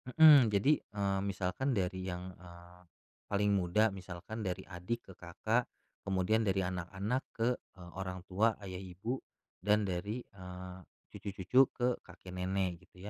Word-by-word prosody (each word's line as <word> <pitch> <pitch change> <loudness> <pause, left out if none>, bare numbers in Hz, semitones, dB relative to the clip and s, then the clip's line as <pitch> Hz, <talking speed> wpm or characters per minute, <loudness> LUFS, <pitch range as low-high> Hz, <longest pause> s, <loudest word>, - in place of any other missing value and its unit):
Mhm, 150 -6 +9
jadi, 105 +9 +3
eee, 100 -2 -1
misalkan 100 +7 -1
dari 95 -1 -1
yang, 90 0 -4
eee, 90 0 -14 0.5
paling 105 0 +2
muda, 100 +3 +3
misalkan 95 +3 -7
dari 95 -3 -2
adik 95 +6 -5
ke - - -11
kakak, - - 0 0.4
kemudian 100 +4 +2
dari 95 0 +2
anak-anak 95 +7 -2
ke, 115 +2 +2 0.3
eee, 90 -2 -11
orang 95 -1 -4
tua- 105 +4 +2
ayah 95 -2 -5
ibu- 95 +7 -4 0.5
dan 105 +1 +4
dari, 100 +6 -2
eee, 90 -1 -9 0.3
cucu-cucu 100 +5 0 0.2
ke 125 0 +1 0.2
kakek 90 0 -11
nenek, 90 -1 -2
gitu 90 - -16
95 Hz, 140 wpm, -34 LUFS, 90-105 Hz, 0.5 s, Mhm